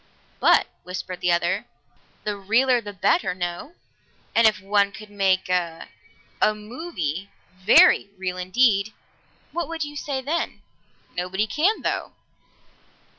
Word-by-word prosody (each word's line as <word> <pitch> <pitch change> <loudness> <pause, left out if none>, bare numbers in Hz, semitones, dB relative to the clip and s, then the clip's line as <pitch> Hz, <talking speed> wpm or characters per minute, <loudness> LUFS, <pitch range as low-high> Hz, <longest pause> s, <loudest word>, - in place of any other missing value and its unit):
"But," - - +5 0.2
whispered 180 0 -6
the 180 - +2
other, 170 0 +1 0.6
"the 210 -1 -2
realer 235 +5 +2
the 205 -2 -7
better, 200 - +1
no? 175 - -5 0.6
And 230 -1 +6
if 215 - +2
one 200 +1 +2
could 210 +1 -12
make 190 -2 +1
a 175 -3 -2 0.5
a 215 - +4
movie 210 - -5 0.2
very 190 +1 +5
real 185 -1 -3
indeed, 200 +2 +2 0.6
what 345 0 -2
would 330 -1 -3
you 295 0 -7
say 280 -2 -3
then?" 300 +6 -3 0.5
"Nobody 185 +4 -1
can, 320 - +1
though." - - -2
200 Hz, 125 wpm, -24 LUFS, 185-250 Hz, 0.6 s, And